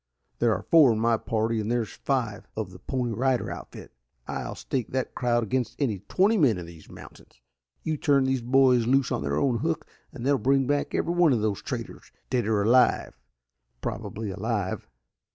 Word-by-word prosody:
"There 120 -1 +3
are - - -6
four 155 -7 +6
in 110 - -2
my 115 +1 +3
party 110 0 -1
and 105 +2 -3
there's 120 -4 -1
five 115 -6 -2
of 105 -4 -3
the 95 - -12
Pony 125 +3 -2
Rider 130 +2 0
outfit. - - -9 0.4
I'll - - -4
stake 125 -5 -3
that 130 -1 -3
crowd 120 -1 +1
against 125 +3 -2
any 115 -9 0
twenty 205 +4 +3
men 125 - +4
in 90 - -6
these 85 -1 -14
mountains. - - -14 0.4
You 155 -1 -1
turn 140 -2 +3
these 130 -1 0
boys 125 -1 +4
loose 135 +1 +2
on - - -1
their 70 0 -1
own 120 - +1
hook 160 +1 -2 0.3
and 130 -6 -7
they'll 140 -1 +3
bring 135 +4 +2
back 145 +2 -1
every 170 - 0
one 175 -5 +4
of 110 -3 0
these 105 -3 -1
traitors, - - -6 0.2
dead 120 -4 +1
or 105 -2 +2
alive 125 +4 +3 0.7
probably 105 -1 -4
alive." 100 -1 -3
120 Hz, 190 wpm, -26 LUFS, 110-135 Hz, 0.7 s, four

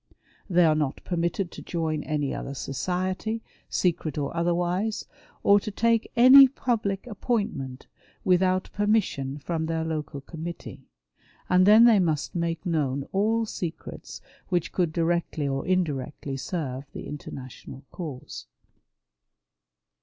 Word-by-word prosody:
They 175 -1 +5
are 155 - +5
not 150 -3 -2
permitted 175 +1 -1
to - - -9
join 160 -3 -2
any 145 -3 -1
other 140 - -5
society, 185 - -2 0.3
secret 160 -4 0
or 145 +2 -2
otherwise, 175 +5 0 0.4
or 200 0 +6
to 210 - -5
take 230 +2 +1
any 260 +3 +10
public 230 -6 -2
appointment 205 - -3 0.4
without 185 0 +2
permission 200 -10 0
from 160 +2 -3
their 165 0 -1
local 155 -3 -4
committee; 165 +4 -8 0.6
and 185 +1 +5
then 215 +2 +8
they 225 -4 +6
must 160 -5 0
make 170 0 -2
known 140 -5 0
all 220 +4 +1
secrets 175 -5 -6 0.3
which 175 -3 0
could 175 -4 0
directly 165 -2 0
or 135 0 -2
indirectly 145 -6 -1
serve 135 -2 -4
the - - -7
International 135 -1 -9
cause. 150 -8 -7
170 Hz, 125 wpm, -26 LUFS, 150-195 Hz, 0.6 s, any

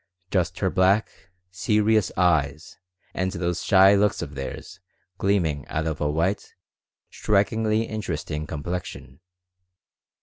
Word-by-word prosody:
Just 90 -4 0
her 95 -2 +1
black, 95 +3 +2 0.4
serious 105 +2 +2
eyes 80 -4 0 0.3
and 95 0 -1
those 85 -1 -2
shy 95 0 +6
looks 100 0 +2
of 70 - -8
theirs 70 +7 -7 0.4
gleaming 85 -8 +1
out 80 +1 -2
of 80 -1 -3
a 75 - +1
white, 85 +7 -1 0.6
strikingly 110 +2 +1
interesting 85 -8 -4
complexion. 75 -4 -6
95 Hz, 110 wpm, -24 LUFS, 80-100 Hz, 0.6 s, shy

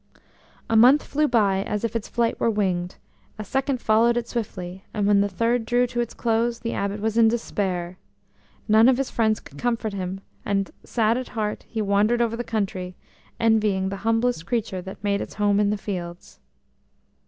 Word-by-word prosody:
A 225 - 0
month 250 +6 +6
flew 300 +1 +1
by 200 -7 +2
as 210 +1 -3
if 230 -1 -2
its 230 - -2
flight 235 -1 0
were - - +2
winged; 185 -4 -1 0.4
a 215 - -5
second 270 +4 -1
followed 230 +2 +3
it 235 -1 -2
swiftly, 190 -5 -5
and 205 -2 0
when 200 -1 +4
the 205 - +1
third 230 +5 0
drew 245 +2 +2
to 240 0 -4
its 240 -1 -2
close 230 0 0
the 230 0 -4
Abbot 200 +1 -2
was 220 +1 0
in 225 - +7
despair. 185 -6 -2 0.7
None 220 +3 +6
of 255 - +3
his 270 -1 -2
friends 220 -2 +1
could - - -14
comfort 230 -3 -1
him, 190 0 -4 0.2
and, 195 -1 -1
sad 230 +1 +1
at 255 - -6
heart, 210 -1 -2
he 220 -2 -2
wandered 205 +4 +2
over 230 -1 +1
the 240 - -3
country, 190 -5 -3 0.4
envying 215 -4 +2
the 200 - -4
humblest 225 -3 0
creature 220 -6 -2
that 190 +3 -10
made 200 -1 0
its - - -7
home 205 -1 +2
in 205 -1 +3
the 210 - 0
fields. 175 -4 -7
215 Hz, 190 wpm, -24 LUFS, 200-235 Hz, 0.7 s, in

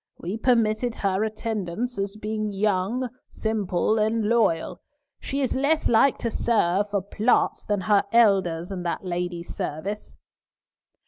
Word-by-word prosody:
We 180 +5 -4
permitted 230 0 +1
her 195 0 0
attendance, 220 0 -3
as 200 +1 -3
being 215 0 -3
young, 205 +5 0 0.2
simple, 215 -1 0
and 220 +1 +1
loyal; 210 -7 +1 0.4
she 275 +1 -3
is 260 - 0
less 285 +4 +2
like 240 +4 +4
to 230 - -3
serve 205 -4 +1
for 200 -2 -1
plots 215 +4 +1
than 205 -2 0
her 205 +1 +3
elders 195 -6 +3
in 185 -2 -4
that 175 +2 -3
lady's 175 -1 -3
service." 195 +8 -5
210 Hz, 135 wpm, -25 LUFS, 190-230 Hz, 0.4 s, like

